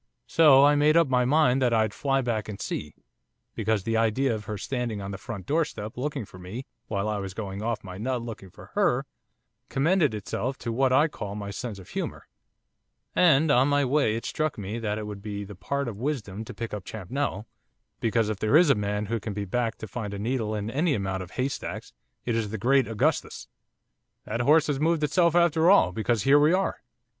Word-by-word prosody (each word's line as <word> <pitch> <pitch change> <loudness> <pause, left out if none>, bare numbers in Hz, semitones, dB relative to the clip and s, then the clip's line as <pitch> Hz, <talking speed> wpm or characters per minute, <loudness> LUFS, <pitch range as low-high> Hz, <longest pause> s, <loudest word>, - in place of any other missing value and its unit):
So 140 -4 +6
I 145 - +5
made 150 +2 +4
up 165 -2 +5
my 125 -1 +3
mind 135 -1 +3
that 120 -2 +3
I'd 110 -2 +1
fly 135 -1 0
back 115 -4 -2
and 100 - -6
see, 75 - -5 0.6
because 110 -3 0
the 115 +1 0
idea 115 +3 +2
of 105 -1 -5
her 105 - -4
standing 120 -1 -3
on 100 0 -5
the 100 - -5
front 110 -7 -7
doorstep 145 - -2
looking 140 -2 -3
for 90 - -14
me, 100 +9 -7 0.2
while 100 -1 -2
I 105 -1 -1
was 95 -1 -6
going 100 -2 -5
off 115 0 -2
my 95 -1 -8
nut 125 +1 -2
looking 110 -5 -8
for - - -15
her, - - +2 0.6
commended 150 - +2
itself 120 +5 -3
to 115 - -4
what 130 +3 +2
I 145 +5 +5
call 105 -9 -6
my 100 -1 -5
sense 110 0 -5
of 95 - -13
humour; - - -5 0.9
and 160 -3 +5
on 130 -1 +4
my 145 -1 +2
way 130 -4 +2
it 115 - -5
struck 155 -3 -2
me 105 +3 -4
that 105 -2 -2
it 110 - -4
would 105 -1 -7
be 100 -1 -5
the 100 +1 -9
part 140 +8 -3
of 110 -4 -5
wisdom 110 -6 -3
to - - -8
pick 115 -2 -5
up 105 -3 -4
Champnell, 110 +2 -4 0.5
because 115 -1 +1
if 105 -2 -3
there 110 +7 +4
is 165 -4 +6
a - - +7
man 105 -1 -2
who 115 +2 -2
can 105 0 -5
be 100 0 -3
backed 115 +3 -1
to 110 - -5
find 105 0 -5
a - - -5
needle 110 0 -1
in 105 +1 -3
any 150 +2 +1
amount 95 -2 -2
of 90 - -8
haystacks 130 +6 -4 0.3
it 120 - 0
is 110 -2 -1
the 110 - -4
great 130 +4 +3
Augustus. 115 -2 -1 0.8
That 115 +3 -2
horse 150 +5 +5
has 145 -3 -1
moved 160 0 +1
itself 170 +3 +3
after 170 -1 +4
all, 195 - +6
because 110 +2 0
here 140 +2 +6
we 150 +3 +4
are. 190 +1 0
115 Hz, 220 wpm, -26 LUFS, 105-140 Hz, 0.9 s, a